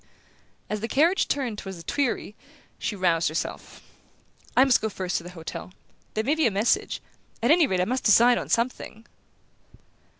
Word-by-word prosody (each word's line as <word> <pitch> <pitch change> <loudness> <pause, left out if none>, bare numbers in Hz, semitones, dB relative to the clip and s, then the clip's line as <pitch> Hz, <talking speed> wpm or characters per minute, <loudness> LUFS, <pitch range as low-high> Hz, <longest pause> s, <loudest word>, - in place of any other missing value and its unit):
As 215 - -3
the 225 - -3
carriage 330 +10 +2
turned 245 -7 -2
toward 195 -1 -7
the 170 - -11
Tuileries 255 - -1 0.5
she 210 - -3
roused 170 -4 +2
herself. 155 - -5 0.7
"I 255 - +8
must 260 -3 +3
go 220 - -1
first 185 -3 -3
to - - -5
the 175 - -9
hotel. 165 +2 -7 0.4
There 220 - 0
may 275 +6 +2
be 315 -4 +2
a - - +3
message 205 +3 0 0.4
at 240 - +4
any 325 -2 +5
rate 185 -5 0
I - - +2
must 255 +5 -2
decide 235 +3 +6
on - - -7
something." 230 -1 -2
220 Hz, 175 wpm, -25 LUFS, 190-260 Hz, 0.7 s, I